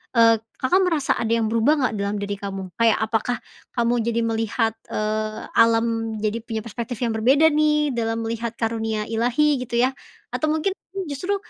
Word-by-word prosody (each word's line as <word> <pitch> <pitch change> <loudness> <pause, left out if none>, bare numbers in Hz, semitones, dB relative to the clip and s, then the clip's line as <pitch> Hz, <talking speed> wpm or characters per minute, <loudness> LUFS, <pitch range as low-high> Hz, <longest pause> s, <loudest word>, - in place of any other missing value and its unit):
eee, 230 -1 +6 0.2
Kakak 355 +9 +3
merasa 315 -6 +1
ada 230 0 0
yang 225 -2 +1
berubah 230 +7 +3
enggak 250 -4 +1
dalam 200 +1 -1
diri 200 0 -2
kamu? 195 -1 -5
Kayak 230 -1 +4
apakah 225 +2 0 0.4
kamu 235 -1 +2
jadi 235 0 0
melihat, 225 0 0 0.2
eee, 215 0 -2
alam 230 0 +5 0.4
jadi 215 +1 0
punya 220 -2 -3
perspektif 235 +1 -5
yang 240 - +1
berbeda 275 +8 +5
nih 300 0 +2
dalam 225 0 -1
melihat 230 0 -3
karunia 225 -1 -1
Ilahi 250 +6 +2
gitu 235 0 0
ya? 255 - +4 0.4
Atau 310 - -1
mungkin 315 +5 0 0.4
justru 360 +8 -1
230 Hz, 165 wpm, -23 LUFS, 220-255 Hz, 0.4 s, eee